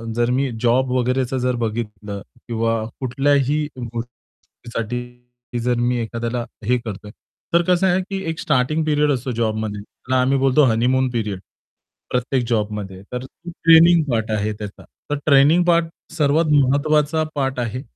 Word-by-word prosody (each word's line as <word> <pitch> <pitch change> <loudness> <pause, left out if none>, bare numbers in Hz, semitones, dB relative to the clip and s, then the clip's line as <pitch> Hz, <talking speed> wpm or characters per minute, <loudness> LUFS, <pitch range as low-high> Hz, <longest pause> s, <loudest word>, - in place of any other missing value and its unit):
जर 120 0 +1
मी 135 +2 +1
जॉब 125 +2 +2
वगैरेचं 130 +1 0
जर 125 0 0
बघितलं 105 -3 -4 0.3
किंवा 115 -1 0 0.2
कुठल्याही 140 +3 +1
गोष्टीसाठी 120 0 -7
जर 125 0 +1
मी 120 +1 +1
एखाद्याला 115 +1 -3 0.2
हे 125 +3 +3
करतोय, 105 -4 -7 0.4
तर 170 - +5
कसं 180 +1 +3
आहे 185 +1 +2
की 195 +1 -5
एक 160 - -4
स्टार्टिंग 150 +3 +1
पिरियड 150 -1 +2
असतो 130 -1 -2
जॉबमध्ये 110 -3 -2
त्याला 130 +5 -2
आम्ही 135 +2 +2
बोलतो 135 +2 +4
हनीमून 125 +3 +2
पिरियड 105 -5 -2 0.7
प्रत्येक 125 0 0
जॉबमध्ये. 105 -4 -2
तर 125 +1 -4 0.2
ट्रेनिंग 165 0 +5
पार्ट 110 -1 -1
आहे 105 0 -1
त्याचा. 105 -1 -9 0.3
तर 145 - 0
ट्रेनिंग 150 +4 +5
पार्ट 170 -1 +3 0.3
सर्वात 155 +1 +2
महत्वाचा 150 +3 +2
पार्ट 135 -2 -1
आहे. 120 +1 -3
125 Hz, 140 wpm, -21 LUFS, 115-145 Hz, 0.7 s, तर